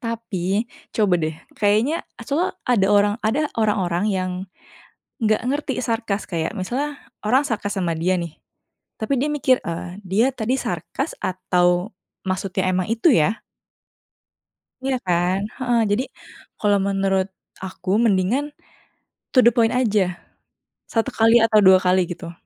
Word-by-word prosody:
Tapi 220 -2 -2 0.2
coba 205 -5 +2
deh, 155 0 -2 0.2
kayaknya 215 +10 +1 0.2
soalnya 320 +8 -1
ada 205 -6 +3
orang, 205 0 +4
ada 290 +7 +1
orang-orang 200 -4 +1
yang 185 -1 -1 0.9
nggak 215 -2 +2
ngerti 280 0 -1
sarkas 225 -3 -1
kayak 170 +4 -2
misalnya 270 +10 -3 0.3
orang 255 +7 +3
sarkas 210 -5 -3
sama 175 -3 0
dia 185 +3 +1
nih, 170 -3 -5 0.6
tapi 250 +4 0
dia 285 - +1
mikir, 260 -3 +3
eee, 175 +3 -5
"Dia 210 +7 +2
tadi 245 +2 0
sarkas - - -4
atau 180 0 +1 0.3
maksudnya 190 0 -1
emang 185 +1 0
itu, 235 +7 +4
ya?" 195 +6 +2 1.4
Iya 265 -1 +1
kan? 180 +1 +1 0.2
Heeh, 245 -3 +1
jadi 235 +6 +1 0.6
kalau 205 -1 +3
menurut 195 -1 +1 0.4
aku 185 0 -6
mendingan 205 +6 +2 0.9
to - - +2
the 235 - +8
point 230 0 +3
aja, 225 -5 +2 0.9
1 225 +3 +1
kali 225 +1 +6
atau 215 -1 +5
2 190 -1 +7
kali, 185 +1 +4
gitu. 170 -1 -7
205 Hz, 135 wpm, -22 LUFS, 185-235 Hz, 1.4 s, the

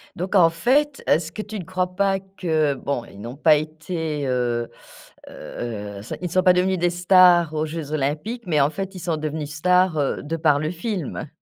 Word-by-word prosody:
Donc 185 +4 -3
en 170 -3 +7
fait, 275 - +1
est-ce 160 0 +2
que 215 - -5
tu 215 0 -7
ne 190 - -5
crois 180 +1 -3
pas 195 0 +1
que 165 -6 -1
bon, 135 -2 -3
ils 100 - -14
n'ont 120 +5 -7
pas 155 0 +5
été, 155 0 -3
heu 120 -2 -1 0.6
heu, 105 -4 -7
ça 110 - -6
ils 180 - -7
ne - - -5
sont 185 - +3
pas 180 -1 +6
devenus 185 +1 +1
des 175 +1 +2
stars 175 -2 +5
aux 155 0 0
Jeux 155 -1 -6
Olympiques, 155 - -2
mais 155 -4 +2
en 140 - +3
fait, 195 +3 -5
ils - - -6
sont 170 -1 -1
devenus 150 -1 -4
stars, 180 +1 +3
heu, 140 - -1
de 165 +3 -3
par 155 -3 +3
le 155 +1 -2
film? 180 - -4
165 Hz, 210 wpm, -22 LUFS, 150-185 Hz, 0.6 s, en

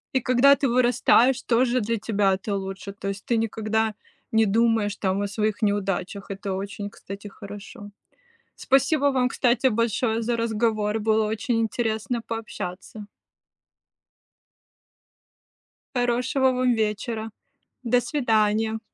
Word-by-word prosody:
И 260 - +5
когда 255 +3 +5
ты 275 0 0
вырастаешь, 250 +1 +3
тоже 245 +1 +2
для 230 +2 -1
тебя 205 -2 +1
это 200 +2 -3
лучше. 195 +1 -5
То 195 0 -5
есть 200 0 -6
ты 235 - +1
никогда 220 0 0 0.4
не 220 0 +4
думаешь 220 -1 +2
там 190 0 -1
о 205 - -1
своих 210 +1 -2
неудачах. 200 -1 -1
Это 195 0 -4
очень, 200 +1 -5
кстати, 200 0 -9
хорошо. 205 0 -10 0.6
Спасибо 275 +2 +2
вам, 255 -1 +1
кстати, 250 0 +2
большое 230 0 0
за 235 +1 0
разговор. 220 -2 0
Было 220 0 +2
очень 225 +2 -1
интересно 225 +1 -1
пообщаться. 215 -2 -6 2.9
Хорошего 250 +2 +1
вам 250 -1 +1
вечера. 220 +1 -2 0.5
До 245 0 +2
свидания. 220 -5 +1
220 Hz, 120 wpm, -24 LUFS, 205-240 Hz, 2.9 s, И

